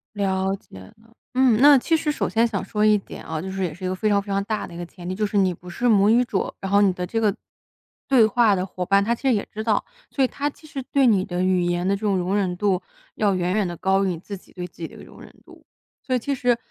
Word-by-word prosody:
了 190 -1 0
解 140 - -14
了。 95 - -14 0.4
嗯， 255 -4 +4
那 290 0 +8
其 325 +6 +1
实 305 -1 -1
首 - - -2
先 230 +1 +2
想 205 -4 -3
说 210 0 0
一 215 -1 +5
点 195 - -10
啊， 160 -1 -4
就 190 +2 -6
是 190 0 -3
也 170 -4 -2
是 185 - -13
一 - - -1
个 185 - -2
非 215 +3 -1
常 200 -1 +3
非 200 - -17
常 200 0 0
大 215 +1 -3
的 175 - -12
一 - - -8
个 175 - -5
前 175 +1 -11
提， 185 - -3
就 210 +2 0
是 205 +1 -5
你 190 -2 +3
不 180 +2 -15
是 240 +8 -1
母 200 -2 +5
语 235 +3 +5
者， 200 -5 -2
然 195 0 -5
后 200 - +5
你 195 -2 +4
的 180 0 -4
这 225 - -1
个 210 -2 +1 0.7
对 260 -4 +5
话 225 -2 +3
的 185 - 0
伙 180 -1 -5
伴， 200 +1 +3
他 235 +3 +1
其 - - -20
实 260 - +4
也 205 - -1
知 215 - -5
道， 220 -2 +1 0.3
所 275 - +1
以 - - +4
他 285 +3 -3
其 310 +2 -16
实 275 -2 -5
对 275 -2 +4
你 195 -5 +3
的 175 0 -3
语 185 -1 +2
言 175 +1 -1
的 200 - +2
这 200 - -9
种 205 -2 +1
容 185 +3 -1
忍 185 -3 0
度 190 -1 0 0.3
要 205 -2 +2
远 180 -1 0
远 210 -4 +1
地 175 - -5
高 195 +2 +2
于 - - +1
你 170 -3 -3
自 200 +3 -8
己 - - -22
对 180 -1 -6
自 - - -30
己 165 - -5
的 - - -18
一 - - -12
个 - - -12
容 - - -15
忍 - - -14
度。 - - -18 0.4
所 255 - 0
以 - - +1
其 280 +4 -2
实 245 -2 +1
200 Hz, 335 characters per minute, -23 LUFS, 185-225 Hz, 0.7 s, 那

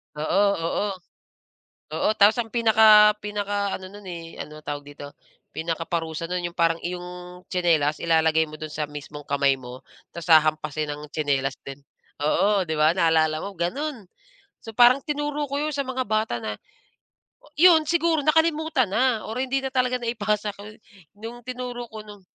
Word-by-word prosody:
Oo, 155 +7 +1 0.2
oo. 165 +5 -1 1.1
Oo, - - +1
tapos 210 +3 +5
ang 225 - -8
pinaka 220 -2 +6
pinaka 205 -1 -2
ano 190 - -11
nun, 205 0 -13
eh, 165 -2 -8
ano 155 0 -10
tawag 145 -1 -5
dito, 145 0 -11 0.4
pinakaparusa 165 0 -3
do'n 180 -1 -2
'yung 170 - -21
parang 165 -1 +2
iyong 180 0 -7
tsinelas 160 -5 +1
ilalagay 160 -1 +3
mo 155 - -9
do'n 155 0 -7
sa 150 0 -2
mismong 150 0 -9
kamay 140 -1 +2
mo, 125 0 -10 0.3
ta's 170 - -7
hahampasin 155 -1 +3
ng 150 - -9
tsinelas 140 -3 0
din 140 +1 -9 0.4
oo, 195 +6 +2
'di 160 - -3
ba, 155 +2 +4
naalala 160 -2 +2
mo, 200 - -6
gano'n. 245 - -3 0.6
So, 225 - -9
parang 245 +4 +6
tinuro 295 -1 -2
ko 280 +1 -2
'yun 305 0 -1
sa 280 - -1
mga 260 0 -3
bata 215 - 0
na, 105 -1 -5 0.9
oh - - -20
'yun, 330 -2 +7
siguro 335 -2 +2
nakalimutan 315 - +2
na 240 -1 +1
or 225 +3 -4
hindi 265 +1 0
na 265 - -2
talaga 255 -1 +1
naipasa 210 -3 -1
ko'y 210 +1 -11 0.4
nung 235 +2 -8
tinuro 250 -1 -5
ko, 215 -1 -8
nung 205 -1 -12
195 Hz, 165 wpm, -24 LUFS, 155-240 Hz, 1.1 s, yun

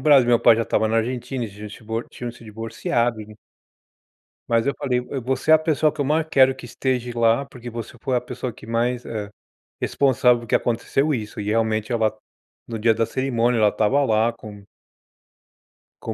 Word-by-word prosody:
Brasil, 135 -4 +5
meu 120 -1 +4
pai 115 - +6
já 115 - +1
estava 110 - +1
na 110 - +1
Argentina, 125 +2 -3
eles 105 -3 -9
tinham 105 0 -9
se - - -9
divor 115 +1 -4
tinham 120 -1 -6
se 120 - -16
divorciado, 115 +1 -2
en 105 0 -11 1.1
Mas 115 +1 +2
eu 140 - +1
falei: 125 -2 0
"Eu 135 - -3
você 130 +5 0
é - - +10
a - - +9
pessoa 155 -1 +2
que 155 - -5
eu - - 0
mais 155 +3 +1
quero 130 -2 +5
que 130 - -10
esteja 125 0 -2
lá, 115 +3 +2
porque 125 -2 -10
você 115 0 -7
foi 130 - -1
a 120 - +1
pessoa 125 0 -5
que 110 - -14
mais, 120 +2 -1
eh, 105 -3 -5 0.5
responsável 125 -3 +2
que - - +1
aconteceu 135 +5 0
isso", 105 -4 -5
e 105 - -4
realmente 110 +1 0
ela, 110 -2 +1 0.5
no 115 - -4
dia 115 +1 +3
da 115 +1 0
cerimônia, 120 -1 0
ela 105 -1 +4
tava 135 +7 +2
lá 115 -1 +2
com 105 -3 -11 1.4
com - - -3
120 Hz, 200 wpm, -22 LUFS, 110-130 Hz, 1.4 s, é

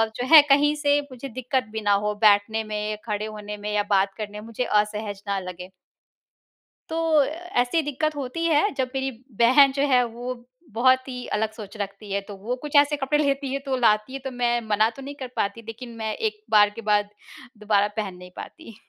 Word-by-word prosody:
जो 245 - -3
है 305 - +12
कहीं 290 +2 +5
से 290 -1 +2
मुझे 255 +2 -7
दिक्कत 255 +1 -1
भी 220 0 -4
ना 205 -1 +1
हो 210 - 0
बैठने 215 +1 +4
में, 210 0 -3
खड़े 210 -1 -2
होने 210 -1 -7
में 210 +1 -5
या 205 0 +2
बात 195 -1 +2
करने 210 -1 -6
में। 210 - -10
मुझे 230 +2 -3
असहज 210 -2 -1
ना 200 -1 0
लगे। 180 -1 -8 1.2
तो 320 -2 +2
ऐसी 315 -2 -1
दिक्कत 305 +1 -2
होती 285 +4 -3
है। 325 +5 +3
जब 255 -1 -1
मेरी 265 0 -1 0.3
बहन 265 +4 +6
जो 275 +1 -2
है। 250 -2 +5
वो 240 +2 -5 0.4
बहुत 255 +4 +3
ही 250 -1 -6
अलग 220 0 -1
सोच 215 -1 -10
रखती 200 0 -6
है 200 +1 0
तो, 200 +1 -10
वो 225 +6 -3
कुछ 295 +3 -7
ऐसे 290 +1 +5
कपड़े 295 +2 +1
लेती 275 -1 -1
है। 275 - -1
तो 270 -1 0
लाती 215 0 +2
है 270 - -4
तो 265 - -3
मैं 240 -1 0
मना 215 +1 +3
तो 255 +4 -12
नहीं 280 +2 -7
कर 260 - -5
पाती। 200 +3 -2
लेकिन 235 +1 -8
मैं 220 -1 -3
एक 425 -1 -3
बार 210 -1 +6
के - - -7
बाद 205 0 +2 0.5
दुबारा 205 -1 +2
पहन 200 -4 -3
नहीं 180 0 -13
पाती। 320 -10 -10
235 Hz, 210 wpm, -24 LUFS, 210-275 Hz, 1.2 s, है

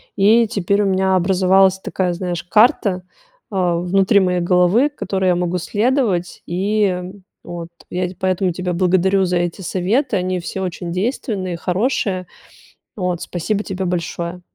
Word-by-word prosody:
И 220 +3 +4
теперь 200 -1 0
у - - +1
меня 190 0 +2
образовалась 190 +1 +3
такая, 185 -1 -2
знаешь, 175 -1 -4
карта, 200 -2 +3 0.5
а, 180 -3 +1
внутри 195 +4 +3
моей 180 -1 +1
головы, 180 +9 +3
которой 195 -9 -2
я 180 - +3
могу 180 0 -1
следовать. 210 -2 0
И, 205 +5 0
э, 180 -1 -2 0.3
вот 170 -1 -7 0.2
я 180 0 -1
т 185 - -9
поэтому 185 0 0
тебя 180 +1 -3
благодарю 190 +2 +2
за 180 0 0
эти 175 +2 -2
советы. 200 - 0
Они 185 0 -1
все 190 +2 -5
очень 175 -1 -4
действенные, 190 -2 -2
хорошие, 185 -1 -1 0.7
вот. 180 -3 -2
Спасибо 200 +4 -2
тебе 190 -2 -4
большое. 175 0 -3
185 Hz, 150 wpm, -19 LUFS, 180-195 Hz, 0.7 s, И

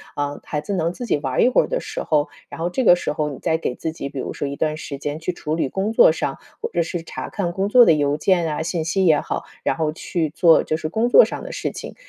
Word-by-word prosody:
啊， 145 0 -3
孩 150 - -3
子 150 +7 -4
能 170 -3 0
自 245 +7 -7
己 220 - +1
玩 130 -3 +1
一 - - +5
会 255 - +4
儿 - - -5
的 - - -1
时 - - -5
候， 150 -1 +1 0.2
然 - - -9
后 165 - 0
这 260 - 0
个 175 - +7
时 175 - -3
候 150 0 -1
你 140 - -7
再 160 -2 0
给 125 - -3
自 160 - -4
己， 155 -3 -6
比 140 - -9
如 - - -4
说 145 - -3
一 140 - -4
段 155 +1 -1
时 150 -2 -6
间 145 +2 -4
去 165 +3 -2
处 155 -2 -4
理 160 -5 -1
工 195 +8 -2
作 225 - +7
上 145 -3 -3 0.2
或 - - -2
者 170 - +1
是 170 +1 -4
查 - - -7
看 185 -5 -2
工 195 +3 -1
作 245 +4 +7
的 165 - +6
邮 145 -1 +1
件 170 +2 +2
啊、 155 0 -2
信 160 0 -2
息 190 +3 +1
也 155 -3 +5
好， - - -4 0.2
然 - - +1
后 160 -2 -1
去 160 0 -2
做 165 +1 +5
就 155 - -1
是 155 - -4
工 220 +9 0
作 - - +8
上 - - -6
的 - - -7
事 - - -3
情。 - - -8
160 Hz, 320 characters per minute, -21 LUFS, 150-180 Hz, 0.2 s, 作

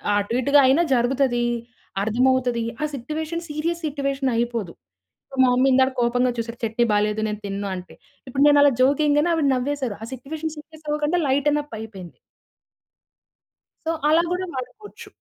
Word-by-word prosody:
అటు 205 +2 -1
ఇటుగా 280 +3 +4
అయినా 270 +6 +4
జరుగుతది. 245 0 +1 0.6
అర్థమవుతది. 245 +2 +1 0.2
ఆ - - 0
సిట్యుయేషన్ 310 +6 -4
సీరియస్ 335 +3 -2
సిట్యుయేషన్ 275 -2 -1
అయిపోదు. 230 -6 -1 0.6
సో 270 - -10
మా - - +5
మమ్మీ 255 +2 +3
ఇందాకడ 265 0 +4
కోపంగా 245 +1 +2
చూసారు 230 +1 -4
చట్నీ 225 +2 +1
బాలేదు 210 +1 +1
నేను 210 -1 -4
తినను 200 0 -3
అంటే. 180 0 -9 0.3
ఇప్పుడు 270 +2 +1
నేను 290 0 +6
అలా 285 0 +6
జోక్‌ 275 +3 +3
ఎయం‌గానే 295 +3 +3
ఆవిడ 320 -3 +1
నవ్వేసారు. 260 -3 -2
ఆ 225 - -5
సిట్యుయేషన్ 305 +5 -5
సీరియస్ 310 0 -13
అవ్వకుండా 300 +3 0
లైటెన్అప్ 290 +1 0
అయిపోయింది. 195 -6 -10 1.7
సో 330 - +2 0.2
అలా 325 +2 +4
గూడా 365 +1 -1
వాడుకోవచ్చు. 415 - -8
265 Hz, 150 wpm, -23 LUFS, 235-295 Hz, 1.7 s, నేను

